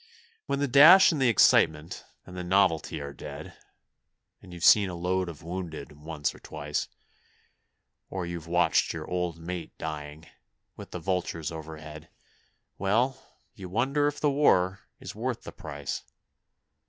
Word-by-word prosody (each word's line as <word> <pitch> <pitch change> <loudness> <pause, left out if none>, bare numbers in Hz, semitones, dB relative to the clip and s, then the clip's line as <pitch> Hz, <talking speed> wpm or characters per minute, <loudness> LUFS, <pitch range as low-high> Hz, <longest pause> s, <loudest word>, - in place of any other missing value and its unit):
When - - 0
the 145 0 0
dash 155 +10 +8
and 150 -4 -2
the 130 - +4
excitement 80 -6 +3 0.2
and 90 - -11
the 90 - -4
novelty 90 -3 +1
are 70 0 -7
dead, - - -9 0.9
And 90 - -14
you've 85 -1 -3
seen 100 -3 +6
a 90 - -6
load 90 +1 -1
of 80 -2 -10
wounded 85 -4 -6
once 75 0 -4
or - - -15
twice, 75 -1 -4 1.2
Or 95 -2 -4
you've 85 -2 -6
watched 90 +1 +2
your - - -6
old 90 -2 -2
mate 85 +1 -7
dying 75 0 -6 0.5
with - - -10
the - - -6
vultures 90 -4 -2
overhead, 80 -1 -9 0.7
Well, 115 +7 +1 0.4
you 95 -5 -9
wonder 135 +9 +1
if 145 0 -3
the 150 - +2
war 95 -9 +3 0.2
is - - -8
worth - - -4
the - - -8
price. 70 -1 -6
90 Hz, 150 wpm, -27 LUFS, 80-100 Hz, 1.2 s, dash